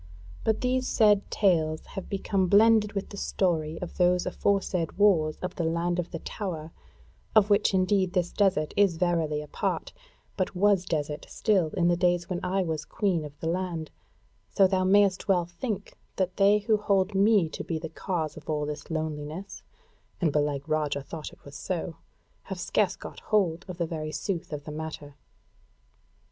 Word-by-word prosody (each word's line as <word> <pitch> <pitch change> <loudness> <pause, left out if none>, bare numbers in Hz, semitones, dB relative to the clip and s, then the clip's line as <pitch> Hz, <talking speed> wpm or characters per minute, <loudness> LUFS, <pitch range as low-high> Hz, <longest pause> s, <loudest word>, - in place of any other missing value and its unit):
But 220 -1 +1
these 255 0 +1
said 210 -2 +3
tales 160 -6 +1
have 195 - -6
become 195 -1 0
blended 210 +2 +5
with 195 -1 -3
the 200 - -9
story 165 -5 -1
of 175 - -8
those 180 0 +3
aforesaid 195 -4 0
wars 170 -7 +3
of 180 - -3
the 170 - 0
Land 170 +2 0
of 175 - -2
the 165 - -5
Tower; 165 -4 -5 0.6
of 210 -1 +5
which 205 - +4
indeed 185 -1 +2
this 180 -2 0
desert 190 -7 +1
is 195 -5 +3
verily 160 -4 0
a - - -11
part, - - -2 0.4
but 185 -1 -2
was 195 -1 +3
desert 150 -4 -3
still 195 -7 +2
in 170 - +3
the 175 - +4
days 175 -1 +1
when 180 -2 -2
I 190 +1 +1
was 160 -3 -3
Queen 185 -2 -1
of 150 -1 -10
the 160 - -2
Land; 170 -2 -2 0.6
so 195 - +4
thou 185 0 +2
mayst 195 0 +3
well 180 -3 +3
think 200 +4 -5 0.2
that 185 -1 -1
they 200 +1 +5
who 215 +1 +2
hold 200 -1 +1
me 200 -2 +4
to - - -6
be 165 - -3
the 160 +1 -5
cause 160 -1 -3
of 155 -1 -12
all 150 -1 0
this 145 0 -6
loneliness 155 +3 -4 0.6
(and 165 -5 +2
belike 145 -1 0
Roger 150 -2 0
thought 155 +3 -7
it - - -19
was 140 0 -11
so) 165 +1 -4 0.5
have - - -6
scarce - - +1
got - - -9
hold 190 -5 0
of 180 -2 -7
the 170 - 0
very 155 -2 -4
sooth 170 0 -3
of 145 -1 -5
the 150 - -7
matter." 150 -2 -6
175 Hz, 180 wpm, -27 LUFS, 160-195 Hz, 0.6 s, blended